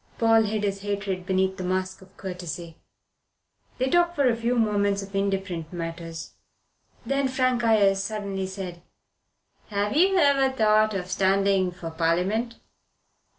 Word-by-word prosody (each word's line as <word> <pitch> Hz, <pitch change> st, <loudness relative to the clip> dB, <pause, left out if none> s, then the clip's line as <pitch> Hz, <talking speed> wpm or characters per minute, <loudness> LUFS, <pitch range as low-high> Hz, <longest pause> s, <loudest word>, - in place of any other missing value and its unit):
Paul 225 Hz, -1 st, +4 dB
hid 210 Hz, 0 st, -2 dB
his 195 Hz, -1 st, -2 dB
hatred 200 Hz, -2 st, -3 dB
beneath 190 Hz, 0 st, +1 dB
the 185 Hz, -, -5 dB
mask 185 Hz, +1 st, -2 dB
of 190 Hz, 0 st, -19 dB
courtesy. 175 Hz, -3 st, -6 dB, 1.0 s
They 255 Hz, -, 0 dB
talked 345 Hz, +4 st, +2 dB
for 280 Hz, -3 st, +3 dB
a 235 Hz, -, +3 dB
few 235 Hz, +2 st, -1 dB
moments 205 Hz, -3 st, +1 dB
of 195 Hz, 0 st, -10 dB
indifferent 195 Hz, -5 st, -2 dB
matters. 165 Hz, -1 st, -6 dB, 0.7 s
Then 275 Hz, 0 st, +1 dB
Frank 255 Hz, -2 st, +1 dB
Ayres 200 Hz, -4 st, +4 dB
suddenly 200 Hz, -2 st, -3 dB
said: 185 Hz, -3 st, -7 dB, 0.9 s
"Have 205 Hz, +2 st, -1 dB
you 380 Hz, +4 st, +4 dB
ever 280 Hz, -4 st, +4 dB
thought 215 Hz, -2 st, +3 dB
of 185 Hz, -1 st, -4 dB
standing 195 Hz, 0 st, +2 dB
for 170 Hz, -2 st, -7 dB
Parliament?" 180 Hz, +9 st, 0 dB
200 Hz, 140 wpm, -25 LUFS, 185-225 Hz, 1.0 s, Paul